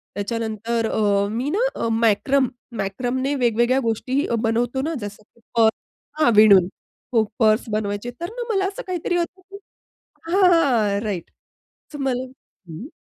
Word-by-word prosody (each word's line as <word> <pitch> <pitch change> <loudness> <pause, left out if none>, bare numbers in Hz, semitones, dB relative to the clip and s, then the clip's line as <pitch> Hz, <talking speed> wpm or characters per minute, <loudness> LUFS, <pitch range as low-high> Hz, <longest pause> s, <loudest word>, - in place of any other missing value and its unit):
त्याच्यानंतर 225 +2 -2
अ, 200 -2 +2
मी 250 +6 -2
ना, 430 +9 +1
अ, - - -2
मॅक्रम 235 +4 +2 0.3
मॅक्रमने 255 +7 -2
वेगवेगळ्या 240 +2 +2
गोष्टीही 255 +4 -1 0.2
बनवतो 240 +3 0
ना. 320 +3 -2
जसं 205 +1 -8
की 235 - -30 0.2
पर्स 220 -1 +4 0.4
हां, 270 - +5
विणून. 200 -4 +7 0.5
हो, 225 -2 +4 0.2
पर्स 220 +1 +3
बनवायचे. 210 +2 -2
तर 345 - -3
ना, 485 0 -5
मला 385 -1 +1
असं 410 +6 -6
काहीतरी 350 -1 -1
होतं 350 +2 -3
की 395 - -9 0.7
हां, 390 +2 +3
हां, 230 -11 +2
राइट 200 -6 -4 0.6
तर 295 - -7
मला 260 -2 -1
हं. 220 - -13
235 Hz, 150 wpm, -22 LUFS, 215-275 Hz, 0.7 s, विणून